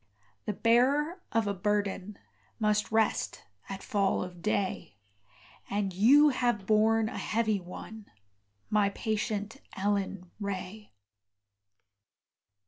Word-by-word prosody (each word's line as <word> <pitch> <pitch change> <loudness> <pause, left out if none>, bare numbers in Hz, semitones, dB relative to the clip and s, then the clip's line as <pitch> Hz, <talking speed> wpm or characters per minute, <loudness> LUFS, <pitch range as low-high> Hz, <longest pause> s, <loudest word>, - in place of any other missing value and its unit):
The 210 - -1
bearer 275 - +2
of 225 -1 +2
a 200 - 0
burden 205 0 -1 0.4
Must 210 -1 +1
rest 220 -1 +1 0.3
at 195 0 -6
fall 200 -3 +1
of 180 -1 -9
day; 195 - -2 0.7
And 200 -2 -1
you 275 +11 +6
have 240 -6 0
borne 220 +1 +3
a - - -5
heavy 220 -2 0
one, 205 +4 -10 0.6
My 210 -1 +3
patient 215 +2 -2 0.2
Ellen 195 -2 -2
Ray. 200 +1 -5
210 Hz, 105 wpm, -30 LUFS, 195-225 Hz, 0.7 s, you